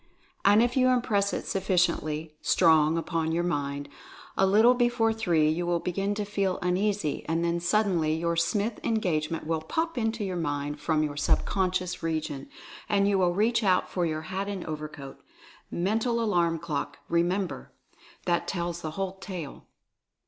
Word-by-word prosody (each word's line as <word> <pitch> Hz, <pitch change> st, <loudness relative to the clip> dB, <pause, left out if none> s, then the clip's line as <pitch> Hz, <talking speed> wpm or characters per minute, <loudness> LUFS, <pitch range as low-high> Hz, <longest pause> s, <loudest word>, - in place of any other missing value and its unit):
And 205 Hz, +3 st, +6 dB
if 245 Hz, 0 st, 0 dB
you 255 Hz, -1 st, +4 dB
impress 210 Hz, -5 st, +2 dB
it -, -, -3 dB
sufficiently 170 Hz, -5 st, 0 dB
strong 160 Hz, -2 st, +4 dB
upon 165 Hz, -1 st, -1 dB
your 170 Hz, +1 st, 0 dB
mind, 145 Hz, -4 st, -2 dB, 0.5 s
a 195 Hz, -, +3 dB
little 220 Hz, +5 st, +6 dB
before 240 Hz, -2 st, +2 dB
three 175 Hz, -9 st, +2 dB
you 170 Hz, +3 st, 0 dB
will 175 Hz, -1 st, +1 dB
begin 195 Hz, +4 st, -2 dB
to 210 Hz, 0 st, -2 dB
feel 195 Hz, -2 st, -1 dB
uneasy, 185 Hz, -3 st, 0 dB
and 165 Hz, +1 st, +1 dB
then 170 Hz, 0 st, 0 dB
suddenly 175 Hz, -4 st, +1 dB
your 170 Hz, +1 st, -1 dB
Smith 210 Hz, +6 st, 0 dB
engagement 165 Hz, -8 st, -1 dB
will 160 Hz, 0 st, -1 dB
"pop" 320 Hz, -, -2 dB
into 225 Hz, -1 st, -1 dB
your 185 Hz, -2 st, -3 dB
mind 145 Hz, -2 st, -2 dB
from 155 Hz, -1 st, +1 dB
your 145 Hz, -1 st, -3 dB
sub 145 Hz, -, +2 dB
conscious 185 Hz, -2 st, -1 dB
region, 155 Hz, -4 st, -3 dB, 0.4 s
and 200 Hz, -1 st, +3 dB
you 200 Hz, -1 st, +2 dB
will 175 Hz, -1 st, +2 dB
reach 230 Hz, +3 st, +2 dB
out 185 Hz, -2 st, +2 dB
for 180 Hz, -, -1 dB
your 155 Hz, -1 st, -2 dB
hat 190 Hz, +3 st, -3 dB
and 200 Hz, -3 st, -4 dB
overcoat. 150 Hz, -3 st, -7 dB, 0.5 s
Mental 225 Hz, +6 st, 0 dB
Alarm 175 Hz, -7 st, +1 dB
clock, 150 Hz, -3 st, -4 dB
remember! 175 Hz, +3 st, -1 dB, 0.5 s
That 175 Hz, -1 st, +1 dB
tells 175 Hz, -2 st, -3 dB
the 155 Hz, -, -4 dB
whole 195 Hz, 0 st, -3 dB
tale. 180 Hz, -7 st, -7 dB
175 Hz, 165 wpm, -27 LUFS, 160-205 Hz, 0.5 s, And